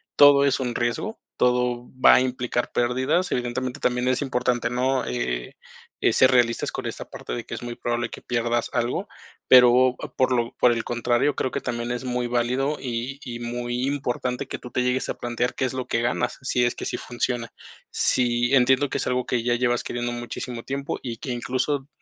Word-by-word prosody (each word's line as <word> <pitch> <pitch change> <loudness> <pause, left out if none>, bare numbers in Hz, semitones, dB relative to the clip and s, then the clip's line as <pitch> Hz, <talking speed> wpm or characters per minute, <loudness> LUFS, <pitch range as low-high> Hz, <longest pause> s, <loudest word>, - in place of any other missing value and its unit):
todo 145 -1 +7
es 140 - +2
un 125 -2 -2
riesgo, 120 - -2 0.2
todo 125 -1 +1 0.2
va - - +9
a - - +5
implicar 125 -1 -2
pérdidas, 130 +9 +1
evidentemente, 125 +2 -2
también 125 -1 0
es 130 +1 +1
importante, 125 -2 0
¿no?, 130 +1 +1
eh - - -3 0.5
eh, - - +4
ser 130 - +5
realistas 120 -2 +2
con - - -4
esta - - -6
parte - - -7
de - - -4
que - - -8
es - - -5
muy 120 -1 -5
probable 120 0 -2
que - - -10
pierdas 120 0 -1
algo, 120 -1 -1 0.4
pero 125 0 +7 0.2
por 130 0 +3
lo 120 -2 0
por 125 - +5
el 115 -1 -1
contrario, 120 +4 +1
creo 130 - -1
que - - -3
también 120 -1 -3
es 125 +1 -3
muy 125 -1 -1
válido 125 +4 0
y 125 +2 -4
y 120 -3 -6
muy 120 +1 -3
importante 130 -3 -2
que - - -5
tú 125 - -11
te 125 - 0
llegues 125 +1 0
a - - 0
plantear 120 0 -1
qué 130 - -1
es 130 - -2
lo 130 -1 -3
que 115 - 0
ganas, 120 - -1
si 125 -1 +1
es 120 - +1
que - - -7
sí - - -2
funciona, 120 -1 -3 0.4
sí 120 +1 +2
entiendo 130 +2 +4
que - - -2
es - - -2
algo 125 0 -1
que 120 -2 0
ya 120 0 +2
llevas 120 0 +1
queriendo 120 0 -3
muchísimo 120 0 -5
tiempo 140 +1 -4
y 120 -3 -4
que, 130 - -7
incluso, 130 +3 -1
125 Hz, 205 wpm, -24 LUFS, 120-130 Hz, 0.5 s, va